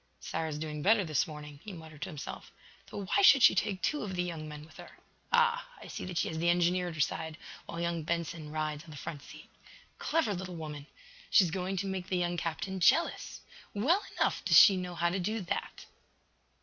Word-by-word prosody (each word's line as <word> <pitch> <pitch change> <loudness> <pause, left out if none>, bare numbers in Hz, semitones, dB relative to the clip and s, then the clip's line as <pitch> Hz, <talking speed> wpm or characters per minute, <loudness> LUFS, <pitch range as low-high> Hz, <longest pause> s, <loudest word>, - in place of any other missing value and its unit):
"Sara 160 0 -3
is 150 - -4
doing 150 -1 -4
better 205 +3 +4
this 155 -1 +1
morning," 150 -2 -9
he 210 - -7
muttered 160 -4 -11
to 190 - -3
himself. 150 -4 -8 0.4
"Though 200 - -5
why 300 - +2
should 275 -10 +7
she - - +9
take 190 -1 -1
two 300 - 0
of 190 -3 -4
the 180 - 0
young 165 -3 -5
men 150 0 -9
with 160 - -17
her? - - -12 0.3
Ah, 475 +1 +3
I - - -11
see - - -5
that 180 -2 -5
she - - +1
has 160 - -4
the 170 +1 +2
engineer 175 +1 +2
at 170 - -5
her - - -8
side, 160 +2 -1 0.3
while 170 - -6
young 170 -1 -1
Benson 165 -1 -3
rides 155 -1 -3
on 165 - -15
the 150 - -9
front 145 0 -6
seat. - - -13 0.5
Clever 320 -10 +1
little 180 -1 -5
woman! 150 -3 -7 0.4
She - - +7
is 170 - -1
going 190 +1 -2
to 195 - -1
make 190 -1 -3
the 185 - 0
young 175 0 0
captain 175 +3 -3
jealous! 330 - +2 0.3
Well 310 - +3 0.2
enough - - +1
does - - +5
she 200 - +9
know 180 -1 -4
how 170 +1 +1
to 190 - -1
do 215 +5 -1
that!" 180 - -4
175 Hz, 225 wpm, -31 LUFS, 155-190 Hz, 0.5 s, she